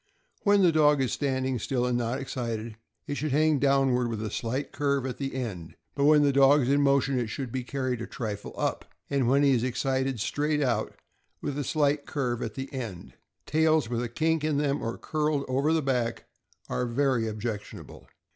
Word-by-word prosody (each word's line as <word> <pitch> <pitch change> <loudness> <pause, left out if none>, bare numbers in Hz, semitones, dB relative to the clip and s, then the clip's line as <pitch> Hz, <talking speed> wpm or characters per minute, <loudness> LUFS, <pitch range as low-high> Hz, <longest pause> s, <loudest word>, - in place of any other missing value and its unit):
When 205 -2 +4
the 175 - +6
dog 150 -2 +4
is 130 -2 0
standing 130 -3 -1
still, 125 +3 -1
and 125 -1 0
not 120 +1 -1
excited, 115 -4 -4 0.3
it 145 - -4
should 145 +1 -2
hang 155 0 +3
downward, 135 -3 +3
with 110 -2 -3
a 105 - -4
slight 125 +6 -3
curve 140 -2 0
at 125 -1 -5
the 135 -2 -3
end; 100 -11 -5 0.2
but 140 - +1
when 150 0 +6
the 140 -1 +3
dog 140 +2 +6
is 125 - 0
in 140 +1 +3
motion 140 -1 +2
it 120 - -1
should 125 +3 -5
be 130 0 -3
carried 130 -2 -2
a 115 - -5
trifle 105 -4 -5
up, - - -1 0.3
and 135 -3 +1
when 140 +3 +4
he 140 - +5
is 125 -3 +2
excited, 130 0 -1
straight 150 +7 0
out, 115 -5 -1 0.4
with 145 - -4
a 145 - -2
slight 145 0 +1
curve 125 -4 -2
at - - -5 0.2
end. 115 -10 -6 0.3
Tails 155 -4 +2
with 120 -1 -1
a 120 - -3
kink 160 +4 0
in 155 -2 +1
them, 145 -1 0
or 115 - -3
curled 150 -2 -1
over 135 +4 +1
the 160 -1 +2
back, 125 -3 -1 0.4
are 125 - -1
very 125 -2 +1
objectionable. 110 -1 -6
135 Hz, 200 wpm, -27 LUFS, 120-145 Hz, 0.4 s, the